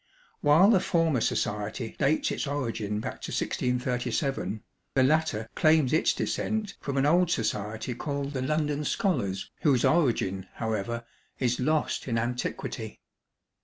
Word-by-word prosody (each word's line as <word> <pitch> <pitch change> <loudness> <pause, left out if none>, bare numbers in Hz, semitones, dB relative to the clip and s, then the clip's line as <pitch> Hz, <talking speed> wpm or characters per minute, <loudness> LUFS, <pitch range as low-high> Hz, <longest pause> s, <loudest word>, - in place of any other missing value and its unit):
While 160 +8 +6
the 195 - +5
former 165 -8 +1
society 105 +3 -2
dates 150 +2 +2
its - - -2
origin 115 -7 -2
back - - -6
to - - -5
1637, 125 - -1 0.3
the 130 - +5
latter 135 -6 +1
claims 155 -4 +3
its 160 - +3
descent 215 -2 -2
from 140 -1 -3
an 135 - +3
old 175 +3 +4
society 110 -2 -2
called 140 +2 -3
the 130 - -2
'London 150 +1 0
Scholars,' 125 - -1
whose 140 -7 +3
origin, 115 - +1
however, 115 +1 -2 0.3
is 125 -2 0
lost 150 +3 0
in 115 -2 0
antiquity. 120 +2 -3
130 Hz, 130 wpm, -28 LUFS, 115-155 Hz, 0.3 s, While